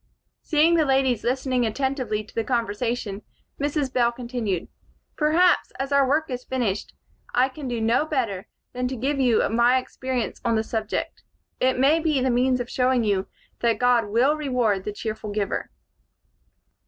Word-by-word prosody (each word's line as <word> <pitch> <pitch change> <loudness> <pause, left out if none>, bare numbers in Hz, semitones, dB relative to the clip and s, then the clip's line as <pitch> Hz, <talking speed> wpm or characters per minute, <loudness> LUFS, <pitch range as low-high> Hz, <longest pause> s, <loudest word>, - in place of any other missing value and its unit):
Seeing 315 +1 +3
the 320 - +4
ladies 265 -4 +2
listening 255 0 0
attentively 250 -2 -1
to 215 - -18
the 225 - -1
conversation, 230 -2 -2 0.4
Mrs. 285 -2 -1
Bell 240 -1 +3
continued: 235 -6 -3 0.5
"Perhaps, 330 +4 +3
as 270 +1 -3
our 280 -1 +4
work 310 +3 +2
is 250 0 -4
finished, 235 -7 -2 0.4
I 255 +2 +4
can 270 +1 -8
do 240 -2 -2
no 230 +7 +2
better 230 -11 -2 0.3
than 250 0 -1
to 260 - -4
give 275 +4 -1
you 245 -4 +3
my 240 +3 +4
experience 255 -1 -3
on 235 -2 +1
the 220 - +1
subject. 220 -1 -3 0.4
It 255 0 +2
may 280 +5 +4
be 310 -4 +1
the 260 0 +1
means 250 +1 +2
of 245 - -3
showing 250 -1 +1
you 200 -3 0 0.3
that 235 -1 +2
God 245 -3 +3
will 245 +8 +3
reward 245 -10 0
the 210 - -2
cheerful 215 0 -5
giver. 205 -1 -2
250 Hz, 165 wpm, -24 LUFS, 225-270 Hz, 0.5 s, the